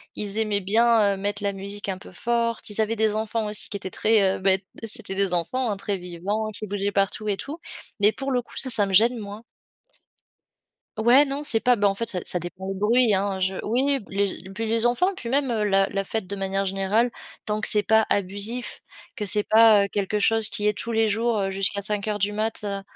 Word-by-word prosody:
Ils 205 0 0
aimaient 210 -2 0
bien, 215 +1 +2
heu, - - -9
mettre 205 +1 -4
la 200 -1 -1
musique 200 +1 -7
un 185 - -3
peu 190 - -14
forte, 230 +4 -2
ils 210 +1 +6
avaient 220 +1 -2
des 215 -1 0
enfants 220 0 -2
aussi 210 - +2
qui 200 - -4
étaient 190 - -7
très, 200 -1 +1
heu, - - -7
beh, 190 0 +1 0.2
c'était 225 -3 0
des 195 -2 -1
enfants, 225 +9 -1
hein, 200 - -4
très 200 0 -3
vivants 185 +5 -4
qui 215 0 -7
bougeaient 200 0 -3
partout 200 +2 0
et 200 - -1
tout 300 +9 -8 0.4
mais 210 +1 +5
pour 270 +3 -5
le 250 -1 0
coup - - -14
ça, 265 - 0
ça 215 -4 +4
me 195 - -5
gêne 230 +5 +4
moins. 210 0 -9 1.5
Ouais, 240 +6 +5
non, 280 0 -4
c'est 235 -7 +6
pas, 245 -2 +3
bah, 205 - +2
en 195 - -1
fait, 230 +2 -3
ça 185 - -1
ça - - +4
dépend 180 +2 -8
le 195 - -3
bruit, 220 +4 +2
hein, 195 0 -1
je 190 +1 -1
oui, 265 +4 0
p - - -17
les 195 -1 -3
e - - -11
puis 225 +4 -5
les 225 +1 +2
enfants 360 +11 +1
puis 235 - -7
même, 275 +1 0
heu, 225 -3 -1
la 195 -1 +2
la 195 0 -3
fête 195 -1 -4
de 200 - -5
manière 195 0 -2
générale 195 +5 0 0.3
tant 215 0 -3
que - - +6
c'est 210 - +8
pas 220 0 +4
abusif, 205 +5 -1 0.3
que 215 - -5
c'est 205 +1 +3
pas, 220 -2 +5
heu, - - -5
quelque 205 +1 -2
chose 225 +1 +3
qui 210 -2 -2
est 210 -1 0
tous 235 - -3
les 225 0 +1
jours, 225 +1 0
heu, 195 -1 -1
jusqu'à 195 +1 0
05:00 210 0 -2
du 205 +2 -1
mat, 215 0 -2
heu, 200 -1 -4
210 Hz, 240 wpm, -23 LUFS, 195-225 Hz, 1.5 s, c'est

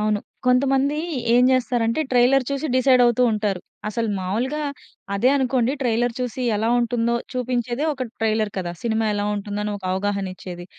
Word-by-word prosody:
అవును 210 -1 +1 0.3
కొంతమంది 270 +3 +3 0.4
ఏం 245 +1 +5
చేస్తారంటే 245 0 +1
ట్రైలర్ 255 +2 +4
చూసి 280 +2 -2
డిసైడ్ 255 -1 +5
అవుతూ 240 +1 +3
ఉంటారు. 205 -4 -1 0.3
అసలు 230 +2 -2
మామూలుగా 240 +11 -2 0.5
అదే 240 +6 +3
అనుకోండి 255 -2 +1
ట్రైలర్ 240 -1 +1
చూసి 250 +1 -3
ఎలా 220 +2 0
ఉంటుందో 235 0 0 0.2
చూపించేదే 250 +1 -2
ఒక 260 -2 -4 0.2
ట్రైలర్ 215 -1 +1
కదా. 175 -2 -3
సినిమా 225 -1 0
ఎలా 205 0 -1
ఉంటుందో 205 0 -4
అని 210 - -2
ఒక 190 - -15
అవగాహనిచ్చేది. 190 -2 -3
235 Hz, 150 wpm, -22 LUFS, 210-255 Hz, 0.5 s, ఏం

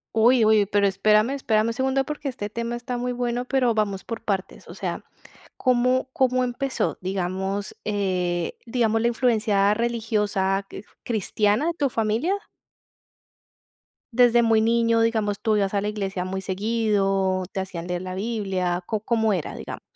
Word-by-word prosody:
Uy, 230 +1 +5
uy. 215 -1 +5
Pero, 200 0 +2
espérame, 215 +4 +3
espérame 220 -5 +1
un - - -2
segundo 265 +1 0
porque 295 -1 -4
este 205 -5 -5
tema 235 +2 -3
está 245 +1 -4
muy 250 +1 -2
bueno, 245 0 -2
pero 250 -3 +2
vamos 200 -3 -1
por 230 -1 -6
partes, 195 -2 -3
o - - -9
sea, - - -4 0.5
¿cómo 255 +1 +2
cómo 255 -1 +2
empezó? 260 +2 -2
Digamos, 190 +1 -3
eh, 185 -4 -1
digamos, 225 -2 +1
¿la 235 - +2
influencia 215 -4 +2
religiosa 210 -4 0
quif 200 - -10 0.2
cristiana 215 - +1
de 340 - 0
tu 290 -4 0
familia? 230 - 0 1.8
Desde 240 0 +5
muy 225 -1 +3
niño, 230 0 +3
digamos, 220 -3 +1
¿tú 215 -1 +2
ibas 195 -1 0
a 200 - +1
la 205 - -1
iglesia 195 -3 -3
muy 190 +1 -3
seguido, 195 -2 0
te - - -3
hacían 180 -3 -5
leer 180 0 -2
la 185 0 -5
Biblia? 190 -4 -1
¿Có 215 +1 -2
cómo 220 -1 +1
era? 175 -6 -3
Digamos. - - -7
215 Hz, 160 wpm, -24 LUFS, 195-240 Hz, 1.8 s, Uy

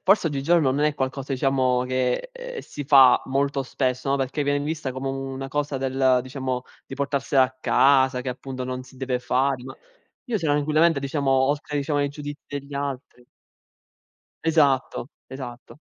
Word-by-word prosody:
forse 195 -2 +4
oggigiorno 145 0 +2
non 145 +3 +1
è 150 - +1
qualcosa 135 0 -3
diciamo 130 -2 +2
che 130 - -1
ehm - - -7
si 145 - -8
fa 135 -3 +7
molto 140 +1 0
spesso, 130 0 -1
no, 140 - +3
perché 135 +2 -1
viene 145 0 +1
vista 150 -4 -3
come 130 +1 -4
una 135 0 -4
cosa 145 0 -2
del 130 -1 +2
diciamo 130 -1 -3 0.2
di - - -7
portarsela 140 -1 +1
a 130 0 -1
casa 130 0 +4
che 130 - -5
appunto 130 +1 -5
non 130 0 -4
si 130 +1 -17
deve 130 -1 -1
fare, 130 +1 0
ma 135 - -8 0.5
io 240 -4 -1
tranquillamente 155 0 +2
diciamo 140 0 -1
oltre 145 +3 +1
diciamo 145 +1 -1
ai 145 - +1
giudizi 145 0 -8
degli 140 0 -6
altri 140 -3 -5 1.2
Esatto, 145 -5 +2 0.2
esatto. 130 +1 -9
135 Hz, 160 wpm, -24 LUFS, 130-145 Hz, 1.2 s, fa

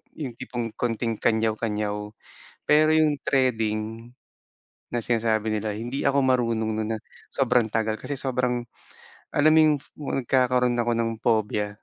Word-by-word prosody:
yung 135 -6 -5
tipong 120 -3 -4
konting 115 -2 -1
kanyaw-kanyaw. 105 -2 -1 0.5
Pero 155 +1 +4
yung 155 -2 +3
threading 115 -3 0 0.8
na 120 - 0
sinasabi 110 -2 0
nila, 105 -1 -2
hindi 120 +5 -3
ako 140 0 +3
marunong 115 -4 +1
nun 110 0 -2
na - - -4 0.4
sobrang 125 -3 +3
tagal. 110 -1 -1
Kasi 145 - -4
sobrang 125 -2 -1 0.7
alam 155 +2 +4
mo 160 - +6
yung 150 -1 +4 0.4
nagkakaroon 125 -1 +2
ako 120 0 +1
ng 115 0 0
phobia. 105 -2 +1
115 Hz, 130 wpm, -25 LUFS, 110-130 Hz, 0.8 s, mo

